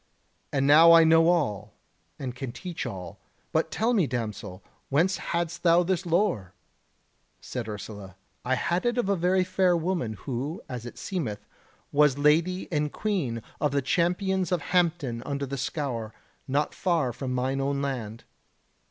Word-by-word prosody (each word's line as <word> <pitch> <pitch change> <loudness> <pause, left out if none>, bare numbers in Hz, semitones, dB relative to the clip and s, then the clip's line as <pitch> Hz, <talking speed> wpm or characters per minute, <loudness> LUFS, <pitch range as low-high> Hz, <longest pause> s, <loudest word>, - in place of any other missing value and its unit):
And 135 -1 +1
now 160 +4 +8
I 165 0 +8
know 165 0 +5
all, 105 - 0 0.4
and 130 -3 -5
can 130 -1 -5
teach 175 +6 -5
all. 90 -3 -7 0.3
But - - +1
tell 230 +3 +1
me, 190 -10 +3
damsel, 105 -6 -5 0.3
whence 170 +7 +2
hadst 170 0 -3
thou 170 0 +5
this 180 0 -1
lore?" 165 - 0 0.8
Said 120 -3 -5
Ursula: 100 -2 -8 0.3
"I 130 +1 +1
had 175 - 0
it 240 0 0
of 240 -5 0
a 200 - +3
very 185 +1 +2
fair 185 -1 +2
woman 165 -9 -1
who, 135 - -4
as 125 -2 -6
it - - -10
seemeth, 140 - -4 0.5
was 145 -2 +4
Lady 165 +6 +2
and 150 -2 0
Queen 150 - -2 0.2
of 150 - +2
the 140 - +2
Champions 180 +4 +1
of 180 -3 +1
Hampton 165 -9 +1
under 140 +1 -3
the 140 +1 -5
Scaur, 135 -5 -3 0.3
not 145 +2 0
far 165 -9 0
from 130 +1 -4
mine 130 +2 0
own 140 0 0
land." 120 -5 -4
145 Hz, 160 wpm, -27 LUFS, 125-175 Hz, 0.8 s, now